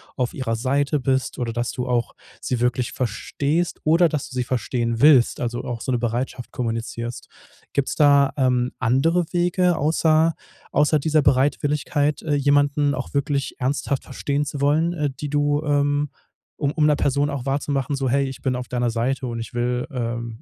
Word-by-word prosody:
auf 125 -2 -1
ihrer 115 -4 -2
Seite 140 +5 0
bist, 130 0 -1
oder, 120 -2 -2
dass 120 +1 -2
du 125 -1 -4
auch 120 -1 0 0.3
sie 125 -2 -2
wirklich 125 0 0
verstehst 140 +8 -2
oder 165 +3 +4
dass 150 -2 -3
du 130 - -10
sie 125 - 0
verstehen 120 -2 -1
willst, 140 -6 +5
also 120 0 -2
auch 120 -2 -4
so 130 - -2
'ne 125 - +2
Bereitschaft 120 +1 -3
kommunizierst. 115 0 -4 0.5
Gibt's 140 - 0
da, 140 -2 +5
ähm, 125 -2 +1
andere 140 +9 +2
Wege 175 0 +2
außer 160 +2 +2 0.4
außer 150 +1 +3
dieser 155 +1 +2
Bereitwilligkeit, 145 +2 +1
äh, 150 -2 0
jemanden 145 0 +2
auch 130 - -6
wirklich 140 0 -1
ernsthaft 135 +1 -1
verstehen 140 +2 -2
zu 145 -1 -5
wollen, 160 +4 +2
äh, 150 -4 -1
die 145 - -4
du, 145 0 +1
ähm 145 0 +1 0.5
um 145 - 0
um 155 -2 +2
'ner 150 - +4
Person 145 +1 +1
auch 135 -3 -4
wahrzumachen, 140 +1 -1
so: 135 -1 -1
„Hey, 140 +2 +2
ich 135 - -9
bin 130 -2 0
auf 125 -1 -5
deiner 120 -1 0
Seite 125 +3 -1
und 115 -1 -4
ich 115 +2 -7
will, 125 +1 -1
ähm 115 -2 -4
140 Hz, 180 wpm, -22 LUFS, 125-145 Hz, 0.5 s, willst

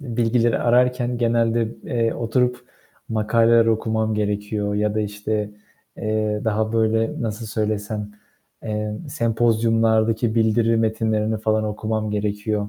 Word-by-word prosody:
bilgileri 120 -2 +1
ararken 125 0 +2
genelde, 115 -1 +1 0.2
eee, 115 -2 0
oturup 125 +2 0 0.4
makaleler 115 +1 +3
okumam 110 -1 0
gerekiyor. 105 0 -2
Ya 105 0 0
da, 110 - 0
işte, 105 0 -3 0.5
eee, 110 -1 -1
daha, 110 0 0
böyle, 115 0 +1
nasıl 110 0 -4
söylesem, 105 -1 -2 0.5
eee, 105 -1 -3
sempozyumlardaki 115 -2 +1
bildiri 115 0 +2
metinlerini 110 -1 0
falan 110 0 0
okumam 110 0 -2
gerekiyor 105 0 -2
110 Hz, 110 wpm, -22 LUFS, 105-115 Hz, 0.5 s, makaleler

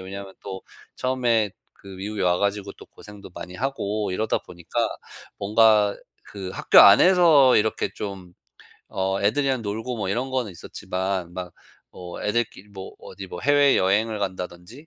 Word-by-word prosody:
왜냐하면 95 +1 -8
또 95 -1 -7 0.3
처음에 120 -5 +1 0.2
그 100 - -16
미국에 100 +2 -5
와 90 -1 +2
가지고 100 0 -1
또 - - -15
고생도 105 -2 -13
많이 90 - -9
하고 110 -6 -2
이러다 110 +4 0
보니까 85 -1 -3 0.5
뭔가 105 0 +3 0.3
그 95 -2 -7
학교 - - +3
안에서 155 - +7
이렇게 110 +1 0
좀 95 -4 -7 0.6
어 95 +1 -1
애들이랑 130 +4 +1
놀고 110 +4 -4
뭐 100 -4 -3
이런 125 +5 -2
거는 125 -7 -2
있었지만 90 +1 -4
막 90 -2 -6 0.4
뭐 90 -1 -8
애들끼리 105 -2 -2
뭐 95 -1 -9
어디 95 - -10
뭐 90 -1 -8
해외 145 -1 +4
여행을 105 +4 +1
간다든지 95 - -6
100 Hz, 310 characters per minute, -24 LUFS, 95-115 Hz, 0.6 s, 안에서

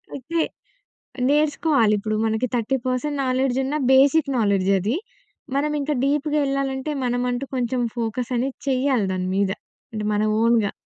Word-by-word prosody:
అయితే, 320 +5 -2 0.9
నేర్చుకోవాలి 290 -6 +3
ఇప్పుడు, 215 +1 -2
మనకి 220 +3 0
30% 255 +4 -1
నాలెడ్జున్నా 265 +2 0
బేసిక్ 275 +2 +4
నాలెడ్జది. 200 - +2 0.6
మనం 300 +2 0
ఇంకా 295 +1 -1
డీప్‍గా 295 +2 +1
ఎళ్ళాలంటే, 275 +1 -2
మనమంటూ 245 +1 -1
కొంచెం 250 0 0
ఫోకసనేది 245 +3 -2
చేయాలి 260 -4 +1
దాని 185 0 -2
మీద. 200 -1 +2 0.4
అంటే, 215 -1 -4
మన 210 0 +1 0.2
ఓన్‌గా. 230 -3 +3
255 Hz, 115 wpm, -23 LUFS, 225-275 Hz, 0.9 s, బేసిక్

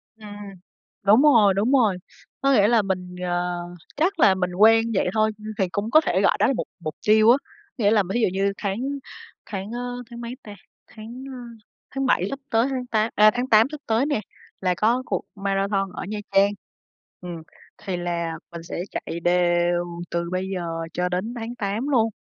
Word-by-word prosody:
Ừm, 220 -1 -14 0.8
đúng 210 +5 +6
rồi, 230 -10 +6
đúng 205 +6 +1
rồi. 225 -9 +3 0.4
Có 275 0 +3
nghĩa 205 -5 +5
là 230 -1 +4
mình, 185 -2 -4
ờ, 175 0 -1 0.4
chắc 355 +7 0
là 195 -3 +6
mình 180 -1 -2
quen 225 +3 +5
vậy 190 - +1
thôi, 215 0 +2 0.3
thì 190 -4 0
cũng 205 +4 -3
có 310 - +7
thể 190 - 0
gọi 200 - +3
đó - - +4
là - - +2
mục 250 - -3
mục 155 -3 -5
tiêu 215 +1 +6
á. 260 - +5 0.4
Nghĩa 210 -4 +3
là, 215 -2 +4
thí 240 - +1
dụ - - +4
như 195 +1 0
tháng 200 -1 -2 0.7
tháng, 200 0 -6
ơ, 245 +1 -5
tháng 235 0 -9
mấy 235 +1 -6
ta, 205 -1 -10 0.3
tháng, 225 +4 -10
ơ, 255 - -7 0.5
tháng 270 0 -2
7 190 -7 +2
sắp 275 - -5
tới 230 +1 +2
tháng 260 -2 -3
tá 220 -1 +1
ơ, 215 0 +7
tháng 245 +1 -2
8 220 +2 +6
sắp 300 -1 -7
tới 225 +4 +1
nè, 290 -7 0 0.4
là 185 -1 +2
có 235 +4 +2
cuộc - - -1
marathon 195 0 -1
ở - - -5
Nha 210 +2 -4
Trang. 195 +1 +4 0.7
Ừm, 175 -1 -6 0.4
thì 190 -3 -4
là, 170 -1 -2 0.2
mình 170 -1 -8
sẽ 170 - -5
chạy 170 - -5
đều 175 0 +2 0.3
từ 170 0 -2
bây 185 +1 -2
giờ 180 - -3 0.3
cho 180 0 -1
đến 185 +6 -2
tháng 235 +1 -5
8 215 +4 -2
luôn. 230 -5 +3
210 Hz, 200 wpm, -23 LUFS, 185-235 Hz, 0.8 s, có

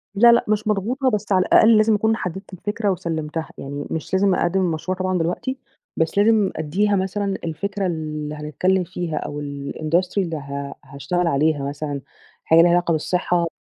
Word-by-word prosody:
لا 235 +3 +7
لأ 235 - +3
مش 215 0 0
مضغوطة، 235 +6 +1
بس 210 -2 -3
على 185 -1 +4
الأقل 220 0 +6
لازم 215 0 +4
أكون 220 +2 +2
حددت 190 -1 -6
الفكرة 205 +3 -2
وسلمتها، 160 -3 -3
يعني 145 +1 -6
مش 160 +3 -4
لازم 190 0 +3
أقدّم 190 +2 +1
المشروع 175 +1 -1
طبعًا 185 0 0
دلوقتي، 180 +10 -2 0.4
بس 160 +3 0
لازم 210 -1 +4
أدّيها 195 +7 +1
مثلًا 195 +1 -1
الفكرة 195 +5 -3
اللي 155 -2 -4
هنتكلم 180 +5 0
فيها 170 -2 -4
أو 145 0 -4
الIndustry 155 +6 -2
اللي 170 -5 0
ه 140 0 -6
هاشتغل 170 +6 -2
عليها 150 -1 +1
مثلًا 145 -1 -4 0.4
حاجة 165 +1 +6
ليها 175 - +5
علاقة 175 -1 +2
بالصحة 170 +2 0
180 Hz, 165 wpm, -22 LUFS, 155-200 Hz, 0.4 s, لا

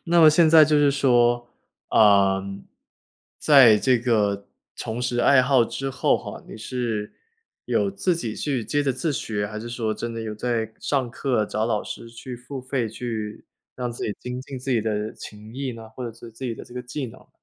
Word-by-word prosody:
那 170 0 +4
么 155 - +9
现 160 +1 +5
在 160 -1 +8
就 150 0 +2
是 145 -1 +4
说， 120 -3 +2 0.4
呃， 100 -2 +5 1.0
在 135 -7 +7
这 125 0 +3
个 105 -4 0 0.3
重 110 +2 -4
拾 125 -1 -1
爱 140 +1 +6
好 130 -2 +4
之 135 +4 -4
后 135 - +2
哈， - - -8
你 - - -10
是 110 -2 -3 0.5
有 195 - +1
自 190 -2 0
己 120 -10 -4
去 135 -6 -1
接 145 +5 0
着 135 -2 +1
自 145 +5 -1
学， 105 -5 -2
还 105 +1 -6
是 115 +2 -7
说 115 -2 -2
真 115 +1 -5
的 115 - -4
有 110 -1 -5
在 110 -1 -2
上 130 -4 -1
课， 125 -4 0
找 110 +1 -1
老 110 -2 0
师 115 - -8
去 120 +1 -8
付 130 +2 -8
费， 130 -2 -2
去 110 -2 -5 0.3
让 125 -1 -3
自 120 - -5
己 105 - -2
精 125 +1 -5
进 135 -1 -7
自 130 +2 -5
己 120 -3 +3
的 105 0 -2
琴 105 +2 -11
艺 135 -2 -3
呢？ 115 -1 -10
或 125 +2 -7
者 115 - -6
是 115 +1 -12
自 115 +4 -9
己 120 -3 -2
的 - - -10
这 120 - -15
个 125 - -4
技 125 +2 -5
能？ 115 - -14
120 Hz, 225 characters per minute, -24 LUFS, 110-135 Hz, 1.0 s, 么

